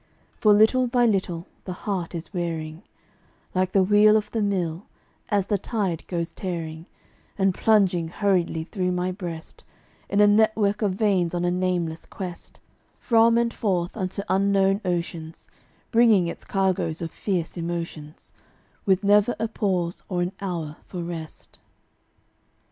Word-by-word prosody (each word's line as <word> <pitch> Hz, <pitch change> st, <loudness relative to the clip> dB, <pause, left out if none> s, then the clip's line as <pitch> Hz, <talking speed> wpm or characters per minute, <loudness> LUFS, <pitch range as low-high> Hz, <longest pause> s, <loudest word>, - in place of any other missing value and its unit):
For 210 Hz, -, +3 dB
little 220 Hz, +5 st, +5 dB
by 245 Hz, 0 st, +3 dB
little 185 Hz, -6 st, 0 dB, 0.2 s
the 185 Hz, -, -4 dB
heart 185 Hz, -4 st, -2 dB
is 165 Hz, -, -6 dB
wearing, 165 Hz, -2 st, -3 dB, 0.7 s
Like 185 Hz, 0 st, +1 dB
the 195 Hz, -, +4 dB
wheel 210 Hz, +2 st, +6 dB
of 210 Hz, -1 st, -3 dB
the 225 Hz, -, -1 dB
mill, 185 Hz, -3 st, -1 dB, 0.4 s
as 200 Hz, -3 st, +1 dB
the 205 Hz, -1 st, 0 dB
tide 190 Hz, -6 st, -2 dB
goes 170 Hz, -2 st, -3 dB
tearing 165 Hz, -3 st, -5 dB, 0.5 s
And 195 Hz, -2 st, +2 dB
plunging 190 Hz, -6 st, +3 dB
hurriedly 175 Hz, -3 st, 0 dB
through 180 Hz, +1 st, -2 dB
my 180 Hz, +1 st, -1 dB
breast, 170 Hz, -3 st, -7 dB, 0.5 s
In 200 Hz, -, +1 dB
a 210 Hz, -, +7 dB
network 210 Hz, 0 st, +3 dB
of 200 Hz, -3 st, +1 dB
veins 190 Hz, -5 st, +1 dB
on 175 Hz, 0 st, 0 dB
a 175 Hz, -, +2 dB
nameless 175 Hz, -3 st, -1 dB
quest, 180 Hz, -3 st, -8 dB, 0.4 s
From 230 Hz, -1 st, +4 dB
and 235 Hz, 0 st, +1 dB
forth, 180 Hz, -4 st, -1 dB
unto 190 Hz, -1 st, -3 dB
unknown 195 Hz, +1 st, +2 dB
oceans, 170 Hz, -3 st, -4 dB, 0.4 s
Bringing 225 Hz, -6 st, +5 dB
its 170 Hz, -, -6 dB
cargoes 185 Hz, -4 st, 0 dB
of 165 Hz, -, -4 dB
fierce 180 Hz, -5 st, -2 dB
emotions, 165 Hz, -3 st, -6 dB, 0.5 s
With 190 Hz, 0 st, +3 dB
never 205 Hz, +3 st, +4 dB
a 225 Hz, -, -1 dB
pause 185 Hz, -6 st, -1 dB
or 175 Hz, -2 st, 0 dB
an 175 Hz, -, -2 dB
hour 165 Hz, -6 st, -4 dB
for 180 Hz, -2 st, -5 dB
rest. 165 Hz, -2 st, -8 dB
185 Hz, 145 wpm, -24 LUFS, 170-205 Hz, 0.7 s, a